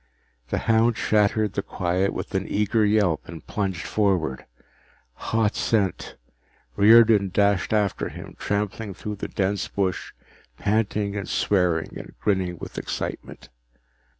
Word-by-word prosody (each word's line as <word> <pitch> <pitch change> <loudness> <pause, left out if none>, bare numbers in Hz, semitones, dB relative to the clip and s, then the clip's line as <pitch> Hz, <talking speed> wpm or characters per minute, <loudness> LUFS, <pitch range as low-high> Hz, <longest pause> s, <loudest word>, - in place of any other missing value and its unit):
The - - -1
hound 115 +1 +3
shattered 105 -1 +2
the 100 - -1
quiet 90 +1 -1
with - - -6
an 95 0 -1
eager 105 +2 +1
yelp 105 -6 +2
and 80 -3 -9
plunged 95 -5 -3
forward. 90 -10 0 0.8
Hot 110 -2 +2
scent! 100 -5 0 0.6
Riordan 110 -2 +6
dashed 100 -1 +2
after 105 -3 0
him, - - -10
trampling 105 0 -2
through 105 +1 -6
dense 100 0 -2
bush, 95 -2 -2 0.5
panting 105 -1 0
and 100 -1 -4
swearing 90 -5 0
and - - -11
grinning 95 -4 0
with - - -7
excitement. - - -6
100 Hz, 125 wpm, -24 LUFS, 95-105 Hz, 0.8 s, Riordan